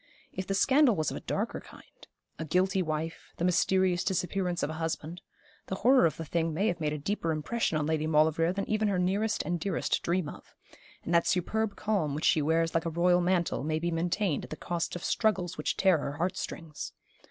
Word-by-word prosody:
If 185 - -5
the 195 - 0
scandal 265 +2 +4
was 155 -3 -1
of - - -4
a - - -8
darker - - -2
kind - - -16 0.3
a - - -2
guilty 185 +4 +2
wife 160 0 -4
the 170 - 0
mysterious 180 0 +2
disappearance 180 -1 -1
of 150 - -1
a 160 +1 -6
husband 165 +1 -4 0.5
the 190 - -2
horror 250 -1 +5
of 155 - -5
the 165 - -5
thing 165 +1 -1
may 195 +6 +1
have 175 - -2
made 150 -2 -1
a 150 - -2
deeper 165 +2 -2
impression 160 +3 -1
on 150 - 0
Lady 155 0 0
Maulevrier 160 +2 +3
than 195 +1 -3
even 215 0 +1
her 200 -2 +1
nearest 200 +5 0
and 175 -1 -2
dearest 195 +4 -1
dream 175 -1 0
of: - - -11 0.5
and 170 - -3
that 170 0 +4
superb 215 +4 0
calm 190 -10 -1
which 155 - -2
she 155 - +4
wears 165 +2 +1
like 165 0 0
a - - 0
royal 175 +2 +3
mantle 175 -5 0
may 155 +1 0
be 170 +2 -1
maintained 170 +1 0
at - - -9
the - - -5
cost 170 +2 -3
of 175 - -6
struggles 190 -6 0
which - - -2
tear 190 -5 +4
her 140 0 -3
heart 175 +5 -1
strings. 165 -5 -6
175 Hz, 220 wpm, -29 LUFS, 160-190 Hz, 0.5 s, horror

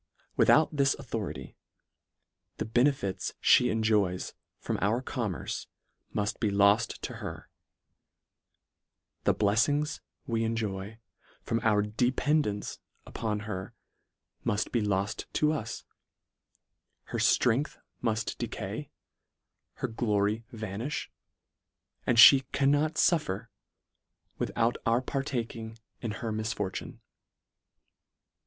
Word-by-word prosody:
Without 155 0 +5
this 140 -1 +3
authority, - - -5 1.0
the - - -2
benefits 120 -3 +1 0.2
(be 125 - +1
enjoys 105 -5 +1 0.2
from - - -3
our 110 +5 +2
commerce, 115 -7 -4 0.4
muft 105 0 -2
be 110 - +1
loft 100 +3 +3
to - - -5
her: - - -7 1.7
The - - +4
bleflings 145 +9 +2 0.3
we 115 -1 0
enjoy 110 -2 -3 0.5
from 115 - 0
our 110 -3 +3
dependance 120 +1 0 0.3
up - - -9
on 105 -2 0
her, 95 -3 -6 0.7
muft 105 - 0
be 120 - +1
loft 100 +1 -1
to 150 0 +3
us; 115 -8 -4 1.3
her - - 0
ftrength 125 +5 +2 0.2
muft 110 -2 -1
decay; - - -4 0.8
her - - -3
glory 105 -1 0
vanifti; 110 +5 -4 1.0
and 120 - +3
lhe 135 +4 +10
cannot 145 +3 +2
fuf 170 -1 +4
fer, 105 +5 -4 0.9
without 115 +1 +1
our 115 +2 +2
partaking 120 -5 -3 0.2
in 115 - -3 0.2
her 110 - -1
misfortune. 110 -3 -3
115 Hz, 100 wpm, -29 LUFS, 105-125 Hz, 1.7 s, lhe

